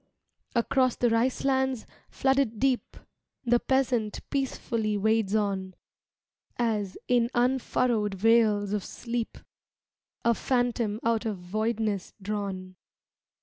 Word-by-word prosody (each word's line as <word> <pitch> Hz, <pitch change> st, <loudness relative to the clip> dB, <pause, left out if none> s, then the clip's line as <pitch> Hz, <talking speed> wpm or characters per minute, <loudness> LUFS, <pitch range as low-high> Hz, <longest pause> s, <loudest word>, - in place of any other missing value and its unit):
Across 255 Hz, +1 st, +2 dB
the 240 Hz, -2 st, +2 dB
rice 235 Hz, +4 st, +1 dB
lands, 265 Hz, -3 st, +1 dB, 0.2 s
flooded 265 Hz, -4 st, +1 dB
deep, 260 Hz, -1 st, 0 dB, 0.5 s
The 240 Hz, 0 st, +4 dB
peasant 250 Hz, -6 st, 0 dB
peacefully 230 Hz, -6 st, -1 dB
wades 220 Hz, 0 st, +2 dB
on 195 Hz, -3 st, -1 dB, 0.8 s
As, 215 Hz, -5 st, -1 dB
in 240 Hz, -1 st, +3 dB
unfurrowed 240 Hz, -4 st, +1 dB
vales 210 Hz, -1 st, +3 dB
of 205 Hz, -2 st, -1 dB
sleep, 235 Hz, -1 st, -4 dB, 0.9 s
A 235 Hz, -, +5 dB
phantom 240 Hz, -3 st, 0 dB
out 230 Hz, 0 st, +1 dB
of 210 Hz, -3 st, -2 dB
voidness 215 Hz, +2 st, -2 dB
drawn. 195 Hz, -2 st, -4 dB
225 Hz, 105 wpm, -28 LUFS, 205-245 Hz, 0.9 s, A